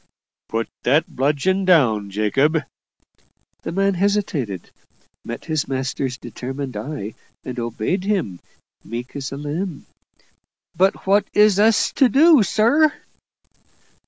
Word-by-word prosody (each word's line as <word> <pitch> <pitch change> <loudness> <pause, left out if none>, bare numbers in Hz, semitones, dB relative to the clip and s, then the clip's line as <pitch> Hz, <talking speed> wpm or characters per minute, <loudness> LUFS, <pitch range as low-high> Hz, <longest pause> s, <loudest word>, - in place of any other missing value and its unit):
"Put 115 -1 -2
that 150 +5 +1
bludgeon 150 +8 +1
down, 120 - +3
Jacob." 135 +10 +1 1.0
The - - -5
man 195 +2 +1
hesitated 175 - -1 0.5
met 120 - -7
his 155 -2 -1
master's 130 -1 -3
determined 130 +3 -6
eye 110 -1 -5 0.3
and 125 -1 -5
obeyed 120 - -2
him, 180 - -1 0.4
meek 120 +4 -7
as 135 -2 -5
a 135 - -5
lamb. 150 +3 -4 0.9
"But 190 +2 +1
what 200 +1 +3
is 210 -1 +5
us 220 +1 +3
to 265 - +5
do, 300 +1 +6
sir?" 235 - +3
150 Hz, 115 wpm, -21 LUFS, 125-195 Hz, 1.0 s, do